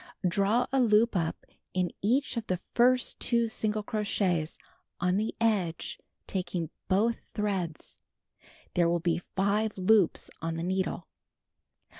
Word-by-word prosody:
Draw 200 +7 +2
a 270 - +2
loop 225 -1 +4
up 165 -3 -1 0.3
in 180 -1 +1
each 255 +8 +1
of 230 -1 -3
the 180 -1 -1
first 250 +1 +3
two 235 -1 +2
single 215 -1 -1
crochets 195 -6 0 0.4
on 180 +2 +2
the 215 +2 -1
edge 200 -8 0 0.3
taking 180 -4 -3 0.2
both 220 +5 +1
threads. 195 -6 -3 0.7
There 170 -1 +3
will 170 0 +2
be 170 0 0
5 205 +3 +1
loops 190 -1 +3
on 165 0 -2
the 165 - -3
needle. 185 -1 -1
200 Hz, 130 wpm, -29 LUFS, 175-220 Hz, 0.7 s, loop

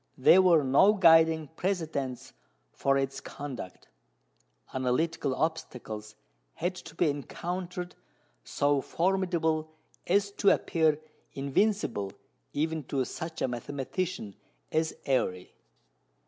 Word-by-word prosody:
There 175 +8 +7
were 170 -5 +5
no 140 +10 +5
guiding 160 -5 +5
precedents 160 -8 -3 0.4
for 135 0 +2
its 135 0 -2
conduct. 130 -10 -8 0.9
Analytical 130 +2 0
obstacles 115 -9 -4 0.4
had 175 +2 -1
to 160 - -11
be 170 - +2
encountered 175 +5 -4 0.5
so 145 -1 +1
formidable 170 -4 0 0.4
as 200 +2 +2
to 200 - +5
appear 160 -2 +2 0.3
invincible 140 - 0 0.4
even 160 +1 -1
to 135 -1 -1
such 160 +4 -5
a - - +2
mathematician 135 - -4 0.4
as 160 0 0
Airy. 90 -10 -1
155 Hz, 100 wpm, -29 LUFS, 135-175 Hz, 0.9 s, There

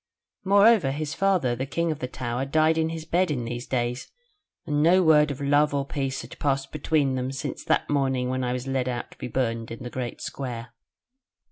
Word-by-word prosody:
"Moreover, 200 -4 +5
his 150 +2 -3
father, 185 -11 +1
the 130 +3 -4
King 170 +3 0
of 150 - -4
the 125 - -3
Tower, 125 0 -3
died 155 +3 +3
in 160 0 +1
his 160 -1 -6
bed 175 +2 +1
in 125 -5 -2
these 120 +1 -5
days, 125 0 -2 0.6
and 145 0 0
no 180 +4 +5
word 150 -2 +5
of 140 - -5
love 145 +1 +2
or 140 -1 0
peace 135 -2 -3
had 120 - -12
passed 135 -1 0
between 150 -2 +1
them 130 0 -2
since 135 +1 -5
that - - +1
morning 135 -3 +1
when 130 0 -1
I 125 - -1
was 125 0 -4
led 135 -1 -1
out 120 -1 -4
to - - -16
be - - -4
burned 115 -2 -2
in 115 +1 -7
the 120 - -6
Great 125 -2 -4
Square. 120 -3 -6
135 Hz, 215 wpm, -25 LUFS, 125-155 Hz, 0.6 s, Moreover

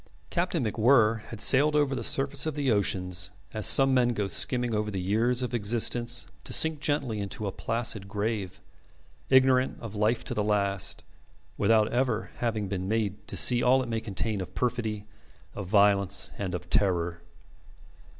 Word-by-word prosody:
Captain 170 -6 -1
MacWhirr 110 0 +2
had 115 - -10
sailed 145 +7 +4
over 145 -2 +1
the 130 - -4
surface 140 +2 +1
of 155 - -4
the 140 -4 -1
oceans 90 -3 0 0.2
as 110 -2 +2
some 135 -1 +6
men 120 -2 +2
go 105 - -2
skimming 120 +4 +2
over 105 0 -2
the 100 -2 -4
years 115 +7 0
of 125 - -5
existence 120 +2 0 0.2
to - - -7
sink 160 -2 +2
gently 140 -7 -2
into 100 +1 -5
a 100 - -3
placid 115 -2 -1
grave, 100 -2 -4 0.7
ignorant 130 -1 +3
of 115 -3 -9
life 110 +2 0
to - - -5
the 105 - -2
last, 100 -2 -1 0.5
without 110 -2 +2
ever 120 -3 -1
having 110 -4 -3
been 95 -1 -4
made 105 -2 -3
to - - -3
see 120 -1 +6
all 130 +1 +3
it 125 - -8
may 115 -1 -3
contain 105 -1 -3
of 90 - -9
perfidy, 110 -4 -3 0.5
of 100 - -7
violence, 100 -1 +2
and 95 -3 -3
of 90 0 -8
terror. 85 -4 0
110 Hz, 170 wpm, -27 LUFS, 100-125 Hz, 0.7 s, some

